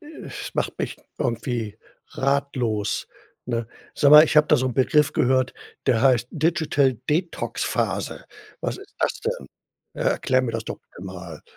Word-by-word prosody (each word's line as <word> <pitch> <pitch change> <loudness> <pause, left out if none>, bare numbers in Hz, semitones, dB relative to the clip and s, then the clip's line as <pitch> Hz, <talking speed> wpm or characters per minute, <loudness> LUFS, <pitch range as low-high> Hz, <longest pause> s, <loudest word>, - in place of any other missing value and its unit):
es 310 -1 -8
macht - - -2
mich - - -3 0.2
irgendwie 115 -3 -2 0.3
ratlos, 130 -7 -1 0.4
ne? 115 -2 -2 0.3
Sag 140 - +4
mal, 150 +1 +11
ich 155 - -1
habe 150 0 +7
da 150 - +5
so 130 +1 0
'n 125 - -1
Begriff 145 +2 +3
gehört, 130 0 +2 0.3
der 115 -3 +3
heißt 125 -3 +4
Digital 155 -4 +2
Detox 165 +3 -1
Phase. - - -2 0.4
Was - - -3
ist 405 +1 -14
das - - 0
denn? 480 +2 -3 0.5
Erklär 130 - +1
mir 120 - -2
das 115 -1 -3
doch, - - -6
bitte - - -15
mal. 90 -4 -8
130 Hz, 155 wpm, -24 LUFS, 115-150 Hz, 0.5 s, mal